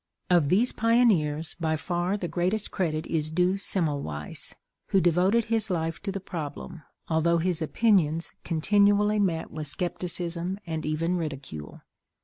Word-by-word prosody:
Of 170 -5 +4
these 220 +8 +4
pioneers, 195 -10 +2
by 160 -2 0
far 175 +4 -1
the 180 - -3
greatest 185 +5 -1
credit 160 -4 -1
is 155 -2 -1
due 180 +4 +1
Semmelweiss, 145 - -2 0.3
who 195 - +3
devoted 185 +6 +3
his 225 -2 +1
life 165 -2 -2
to 200 - -3
the 195 - -4
problem, 165 -3 -6 0.3
although 165 +1 +2
his 170 0 0
opinions 165 -3 +2
continually 205 +5 +3
met 175 -5 0
with 155 -1 -5
scepticism 175 +2 -2
and 160 -3 -4
even 165 +4 0
ridicule. 135 - -6
175 Hz, 135 wpm, -27 LUFS, 160-195 Hz, 0.3 s, Of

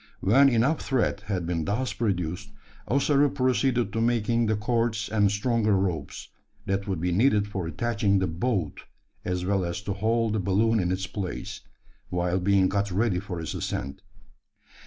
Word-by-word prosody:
When 135 +8 +5
enough 125 +6 +2
thread 125 -6 0
had 95 -5 -2
been 85 -1 -1
thus 120 +6 -1
produced, 95 -3 -2 0.4
Ossaroo 140 +2 +3
proceeded 130 -4 +1
to 115 - 0
making 115 0 +1
the 110 - +2
cords 110 0 -1
and 105 -2 +3
stronger 110 -1 +1
ropes, 90 -7 -3 0.4
that 95 +1 -2
would 95 -4 -2
be 90 +2 -1
needed 105 +1 +3
for 95 -4 -4
attaching 105 +1 0
the 95 - +1
"boat" 90 0 -2 0.4
as 90 0 -2
well 95 0 +1
as 85 +1 -3
to 100 - -2
hold 110 +2 0
the 110 - 0
balloon 105 +4 +2
in 90 -1 0
its 95 +1 -2
place, 100 +1 -5 0.5
while 90 +1 0
being 95 0 +3
got 100 +1 -1
ready 95 0 +1
for 90 -3 -6
its 80 - -4
ascent. 70 +1 -4
100 Hz, 165 wpm, -26 LUFS, 95-115 Hz, 0.5 s, When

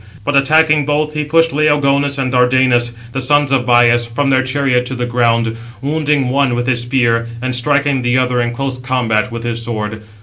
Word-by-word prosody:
But 145 - -1
attacking 150 +1 +3
both, 150 +1 -1
he 150 0 -2
pushed 165 +2 +2
Laogonus 140 -1 +1
and 130 -2 -2
Dardanus, 125 -1 +2 0.2
the 135 - -3
sons 145 +1 +1
of 130 -2 0
Bias, 120 -1 +3
from 135 +4 -1
their 130 0 +3
chariot 130 -1 0
to 130 - -5
the 125 0 -3
ground, 115 -2 0 0.2
wounding 145 -2 -1
one 135 -2 +1
with 120 0 -2
his 125 -2 0
spear, 120 -2 0
and 130 +1 -3
striking 140 +2 +1
the 120 +1 0
other 125 -1 0
in 120 - -1
close 130 +1 -4
combat 125 -2 -1
with 115 0 -6
his 115 0 -3
sword. 110 -2 -5
130 Hz, 195 wpm, -15 LUFS, 120-140 Hz, 0.2 s, attacking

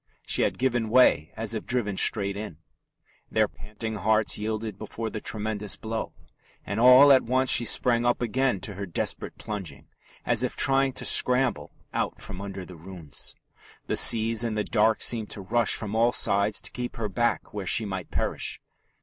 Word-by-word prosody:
She - - +1
had - - 0
given 120 -3 -1
way 110 - +3
as 115 +1 0
if 110 - -6
driven 115 -5 -1
straight 100 0 +1
in. 105 -7 -7 0.7
Their 110 -1 +2
panting 110 +1 -7
hearts 110 0 +1
yielded 110 -1 -4
before 110 +1 -6
the 110 - -6
tremendous 105 -1 -2
blow; 110 0 -5 0.5
and 100 +3 -3
all 125 +4 +8
at 130 - +6
once 130 +2 +1
she 120 - +4
sprang 120 +1 +3
up 120 0 +1
again 125 -3 -1
to 105 - -6
her 100 +1 -6
desperate 85 - -3
plunging, 90 -10 -7 0.4
as - - +2
if - - -2
trying 135 0 +2
to 130 - -4
scramble 125 - +3 0.2
out - - -3
from 90 - -9
under 100 -2 -7
the 90 - -12
ruins. 85 -2 -7 0.5
The - - -2
seas 115 0 +5
in 115 -2 -2
the 105 - -1
dark 110 0 +1
seemed 115 -3 +1
to 100 - -7
rush 115 +4 0
from 105 -2 -6
all 115 +2 +3
sides 100 -2 +2
to - - -6
keep 125 0 -6
her 115 -2 -3
back 120 +4 -2
where 100 -3 -5
she 110 - +1
might 95 -3 -6
perish. - - -2
110 Hz, 185 wpm, -26 LUFS, 100-120 Hz, 0.7 s, all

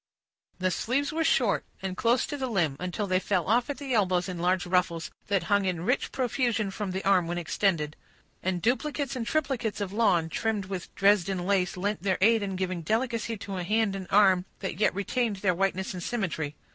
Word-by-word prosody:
The 185 0 0
sleeves 270 - 0
were 325 +1 +1
short, - - +2 0.2
and 190 -1 -3
close 235 +4 +2
to - - -4
the 265 -2 -2
limb, 175 - +1
until 180 +4 -2
they 185 -1 +2
fell 185 -3 0
off 240 +6 +2
at 285 - -3
the 275 -3 -4
elbows 185 -5 +2
in 180 -2 -5
large 180 +1 +1
ruffles, 175 -2 0 0.2
that 200 -2 +1
hung 200 -1 +2
in 180 -2 -1
rich 250 +6 0
profusion 240 -5 0
from 205 0 -4
the 190 +1 -4
arm 185 -4 +4
when 175 +1 -2
extended; 165 -3 0 0.5
and 180 -2 -2
duplicates 280 +3 0
and 235 -3 -3
triplicates 260 -8 -1
of 200 -1 -3
lawn, 195 -7 +3
trimmed 215 +3 -1
with 185 -2 -5
Dresden 195 -2 +3
lace, 190 -2 +1
lent 200 0 -1
their 190 -1 +1
aid 225 +3 +4
in 195 -2 -3
giving 185 -2 -2
delicacy 230 +4 -1
to 195 -1 -6
a 180 - -2
hand 210 +1 +1
and 190 -2 -6
arm 190 -3 +5 0.2
that 190 -2 -4
yet 210 - +3
retained 220 +2 0
their 190 -1 +1
whiteness 190 +1 -1
and 180 - -6
symmetry. 165 -9 -2
195 Hz, 205 wpm, -28 LUFS, 180-225 Hz, 0.5 s, arm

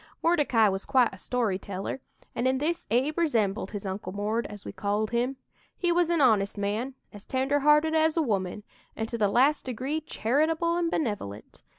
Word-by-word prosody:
"Mordecai 290 -10 +4
was 195 -1 -1
quite 255 -6 +3
a - - -9
story 225 -6 -1
teller, 195 +7 -5 0.3
and 245 - 0
in 260 0 +2
this 320 +5 -2
Abe 265 +9 +1
resembled 225 - +1
his 205 -1 -6
'Uncle 190 -1 -4
Mord,' 210 +4 -1
as 205 -1 -10
we - - -5
called 210 +1 -1
him. 245 +3 0 0.4
He 350 -1 +1
was 345 -1 +2
an 340 -3 +2
honest 215 -6 +3
man, 215 +6 -2 0.2
as 205 0 -11
tender 270 +2 +1
hearted 300 +2 +4
as 320 0 +2
a - - +4
woman, 200 -4 -2 0.3
and 220 - -3
to 235 - -3
the 210 - +4
last 270 +8 +3
degree 260 +5 -3
charitable 315 +6 0
and 345 -1 0
benevolent. 205 - -4
245 Hz, 190 wpm, -27 LUFS, 205-300 Hz, 0.4 s, Mordecai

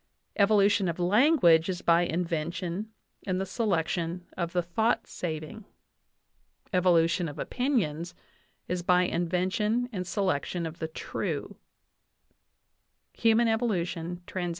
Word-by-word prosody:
Evolution 200 -1 +4
of 170 - -2
language 185 - +4
is 180 -1 -3
by 170 0 +4
invention 175 +3 -2 0.4
and 185 -1 0
the 190 - -1
selection 175 -4 -1
of 170 -2 -2
the 175 0 0
thought 220 +8 0
saving. 160 +5 -6 1.1
Evolution 175 -1 +3
of 145 - -10
opinions 175 - -1 0.5
is 180 0 -2
by 180 +1 +3
invention 185 +7 0
and 185 -5 -4
selection 185 -3 -1
of 160 0 -7
the 160 - -2
true" 160 - -4 1.6
(Human 230 +1 +3
Evolution, 180 -6 -1
Trans. 180 -2 -3
180 Hz, 110 wpm, -28 LUFS, 170-205 Hz, 1.6 s, Evolution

